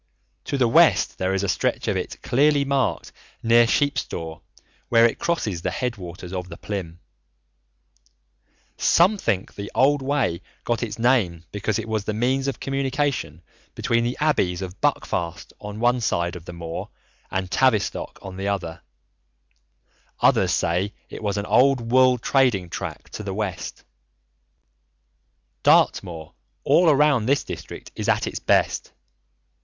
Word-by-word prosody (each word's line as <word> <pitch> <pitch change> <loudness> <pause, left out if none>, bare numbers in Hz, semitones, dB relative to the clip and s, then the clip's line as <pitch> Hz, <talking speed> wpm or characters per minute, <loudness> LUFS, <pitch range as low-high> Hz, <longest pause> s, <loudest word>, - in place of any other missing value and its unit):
To 140 - -2
the 125 -3 +3
west 115 - +4
there 95 +1 0
is 95 - -1
a - - 0
stretch 90 - -1
of - - +1
it - - -4
clearly 145 +2 +3
marked 140 -1 -1 0.3
near 115 +1 +5
Sheepstor 85 - -1 0.5
where 115 -1 +6
it 115 - +1
crosses 110 - -1
the - - -1
head 125 -2 -2
waters 90 -1 -9
of 90 -1 -4
the 85 - -9
Plym. 90 -5 -5 1.8
Some 195 +5 +4
think 100 - -1
the 100 0 -7
old 145 +2 +4
Way 130 -11 0 0.2
got 120 -1 -1
its 120 -3 -4
name 110 -9 +1
because 105 0 -1
it 110 -1 -4
was 110 -2 -2
the 110 - -2
means 130 +4 0
of 135 - -3
communication 135 - -2 0.3
between 115 0 +1
the 120 +2 -2
Abbeys 95 - +1
of 95 +1 -8
Buckfast 85 -1 -2
on 105 +1 -7
one 120 +1 +2
side 85 -5 0
of 85 -2 -10
the 90 - -8
moor 85 -1 -6 0.4
and 95 -1 -3
Tavistock 120 -5 +1
on 95 -1 -8
the 95 +1 -3
other. 90 -5 -3 1.4
Others - - +3
say 90 +4 0 0.2
it - - -7
was 105 -1 -1
an 100 - -2
old 125 -2 +3
wool 130 0 +5
trading 115 -8 +1
track - - -6
to - - -6
the 100 -2 -5
west. 105 -4 -4 1.8
Dartmoor 80 -3 +2 0.3
all 175 -1 +5
around 145 -6 +3
this 140 +2 +2
district - - -8
is - - -2
at - - +2
its - - -4
best. - - +1
110 Hz, 150 wpm, -23 LUFS, 95-130 Hz, 1.8 s, where